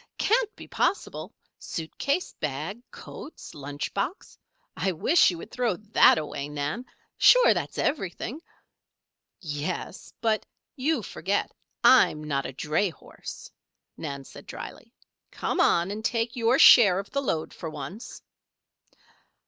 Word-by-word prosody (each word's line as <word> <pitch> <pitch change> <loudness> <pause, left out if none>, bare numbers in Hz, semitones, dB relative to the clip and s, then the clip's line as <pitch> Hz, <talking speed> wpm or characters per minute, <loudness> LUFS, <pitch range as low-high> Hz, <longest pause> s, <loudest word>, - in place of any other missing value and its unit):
"Can't 455 0 +1
be - - -11
possible. 400 - -1 0.3
Suit 160 -1 -6
case, 280 +6 0
bag, 155 - -4
coats, 310 - -10
lunch 145 0 -5
box 260 - -3 0.4
I 190 - 0
wish 295 - +4
you 175 - -4
would 190 - -10
throw 240 -6 0
that 215 0 +5
away, 145 -2 -4
Nan! 150 - -3 0.3
Sure, - - +7
that's - - -4
everything." 260 - -2 1.0
"Yes. 155 +3 -5
But 220 -2 +1 0.3
you 275 -2 0
forget 195 +3 -2 0.3
I'm 155 -11 +6
not 140 -2 -1
a - - -6
dray 155 +9 0
horse," 165 - -11 0.4
Nan 140 -3 -6
said - - -13
drily. - - -9 0.4
"Come - - -3
on 175 +3 +3
and 215 +1 -5
take 230 +1 -1
your 240 +1 +3
share 200 -10 +8
of 195 +1 -5
the 280 - 0
load 160 - -2
for 165 - -6
once." 155 - -8
195 Hz, 130 wpm, -26 LUFS, 155-245 Hz, 1.0 s, share